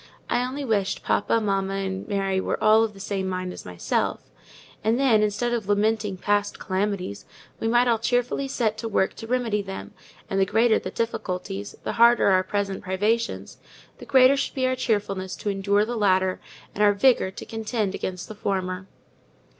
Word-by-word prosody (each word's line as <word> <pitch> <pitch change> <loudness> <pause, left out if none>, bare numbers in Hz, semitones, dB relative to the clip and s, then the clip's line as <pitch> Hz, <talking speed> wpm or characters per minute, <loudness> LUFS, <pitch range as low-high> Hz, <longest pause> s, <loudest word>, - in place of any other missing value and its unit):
I 245 - +2
only 270 +3 -4
wished 205 -5 0
papa, 230 - +1
mamma, 195 -2 -1
and 190 -1 -3
Mary 195 -2 0
were - - -1
all 220 +1 +5
of 220 -2 -2
the - - -12
same 195 -1 -3
mind 185 -1 -3
as - - -10
myself; 90 -1 -2 0.5
and 225 +3 +2
then, 245 -6 +4
instead 215 +3 0
of 220 -4 -3
lamenting 210 -1 +1
past 205 +2 0
calamities 190 - -2 0.3
we 225 - -1
might 240 +2 +3
all 230 -2 +2
cheerfully 245 +4 0
set 220 -5 -1
to 225 - -3
work 190 -2 +1
to 225 - -8
remedy 235 -4 0
them; 195 -1 -8 0.3
and 195 - -1
the 195 - +4
greater 225 +2 +3
the - - -5
difficulties, 180 - -4
the - - -2
harder 235 -2 +6
our 185 -1 +4
present 195 0 -2
privations, 210 +5 -1 0.4
the - - -10
greater 260 0 +6
should 275 - -2
be 260 -1 +1
our 255 0 +1
cheerfulness 205 -6 -1
to 205 - -3
endure 200 +1 +1
the 240 +2 -4
latter, 190 -3 +2 0.3
and 210 - 0
our 205 0 +6
vigour 230 -2 +3
to 190 - -9
contend 220 -2 -2
against 180 -2 -4
the - - -7
former. 190 -2 -3
205 Hz, 185 wpm, -25 LUFS, 190-230 Hz, 0.5 s, harder